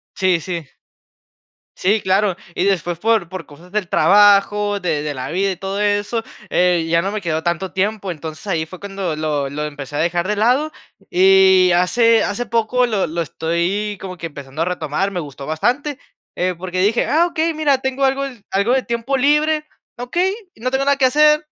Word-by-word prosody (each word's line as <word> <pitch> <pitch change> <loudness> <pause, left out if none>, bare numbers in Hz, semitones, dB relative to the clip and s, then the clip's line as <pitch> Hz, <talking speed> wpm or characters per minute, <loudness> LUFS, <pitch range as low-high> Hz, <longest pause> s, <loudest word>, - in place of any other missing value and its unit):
Sí, 185 -3 +2
sí. 170 0 -4 1.1
Sí, 205 +4 +2
claro. 190 0 +1 0.2
Y 180 - 0
después, 175 -3 0
por 220 -3 +1
por 185 -4 -7
cosas 170 +5 -16
del 210 -4 -1
trabajo, 205 0 +4
de 160 -6 -1
de 150 -1 -3
la 130 +1 -5
vida 190 +4 0
y 185 - -7
todo 195 +2 -4
eso, 205 +2 0 0.3
eh, 180 -2 +2
ya 170 0 +3
no 195 - -2
me 215 - -3
quedó 160 -2 -1
tanto 175 +1 -2
tiempo. 200 0 -1
Entonces, 160 +1 -7
ahí 165 -5 -1
fue 180 +3 -11
cuando 195 -5 -4
lo 150 -3 -1
lo 150 +2 -4
empecé 145 -1 -7
a - - -1
dejar 175 +2 0
de 210 - 0
lado. 255 +9 +2 0.4
Y 190 0 +5
hace 230 +6 +3
hace 240 +4 -3
poco 235 +2 +1
lo 210 -5 0
lo 170 +2 -2
estoy 170 +7 -2
como 185 -1 -7
que 165 - -5
empezando 140 0 -6
a - - +2
retomar, 180 +1 -1
me 180 -3 -3
gustó 140 -2 -9
bastante, 255 - -1 0.4
eh, 180 0 0
porque 185 +1 -3
dije: 215 +4 +2
"Ah, 335 +3 +3
okey, 330 -1 0
mira, 295 -3 +2
tengo 265 +1 -1
algo 270 +1 +1 0.3
algo 200 +5 +1
de 265 - +1
tiempo 235 +3 -2
libre, 300 +3 +2 0.3
okey, 350 +11 -1 0.2
no 250 +3 -3
tengo 265 +1 0
nada 280 0 +3
que 260 - +4
hacer, 300 +3 +4
195 Hz, 190 wpm, -19 LUFS, 170-235 Hz, 1.1 s, Y